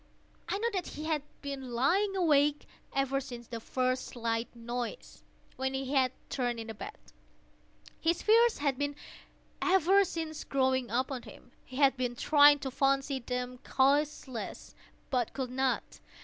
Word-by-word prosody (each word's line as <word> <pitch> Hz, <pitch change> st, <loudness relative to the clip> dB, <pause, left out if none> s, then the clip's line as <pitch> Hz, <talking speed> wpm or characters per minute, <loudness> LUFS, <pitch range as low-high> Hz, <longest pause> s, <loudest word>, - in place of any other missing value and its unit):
I -, -, 0 dB
knew 465 Hz, +3 st, 0 dB
that 370 Hz, -3 st, -2 dB
he 305 Hz, -, -7 dB
had 315 Hz, -2 st, 0 dB, 0.2 s
been 270 Hz, -3 st, -5 dB
lying 375 Hz, +12 st, +2 dB
awake 295 Hz, -5 st, +3 dB, 0.3 s
ever 275 Hz, 0 st, 0 dB
since 245 Hz, -3 st, -8 dB
the 230 Hz, -1 st, -6 dB
first 255 Hz, +2 st, -1 dB
slight 230 Hz, -1 st, -2 dB
noise, 240 Hz, -, -5 dB, 0.4 s
when 265 Hz, 0 st, -1 dB
he 265 Hz, +1 st, -3 dB
had 260 Hz, -2 st, +3 dB, 0.2 s
turned 245 Hz, -3 st, -1 dB
in 225 Hz, -, -5 dB
the 225 Hz, -, -6 dB
bed. 400 Hz, -, -8 dB, 1.0 s
His 335 Hz, +1 st, +1 dB
fears 460 Hz, +2 st, +5 dB
had 280 Hz, -2 st, 0 dB
been 285 Hz, 0 st, -1 dB, 0.7 s
ever 380 Hz, +2 st, +5 dB
since 325 Hz, -4 st, -4 dB
growing 260 Hz, -2 st, +1 dB
upon 255 Hz, +2 st, -1 dB
him. 245 Hz, -, -14 dB
He 255 Hz, -, -12 dB
had 275 Hz, -2 st, +4 dB
been 245 Hz, -1 st, -1 dB
trying 290 Hz, +2 st, +6 dB
to 265 Hz, -, -3 dB
fancy 275 Hz, +1 st, +1 dB
them 250 Hz, 0 st, -4 dB
causeless, 275 Hz, -3 st, 0 dB, 0.4 s
but 250 Hz, -4 st, 0 dB
could 260 Hz, -2 st, -3 dB
not. 265 Hz, 0 st, -1 dB
270 Hz, 150 wpm, -31 LUFS, 250-295 Hz, 1.0 s, trying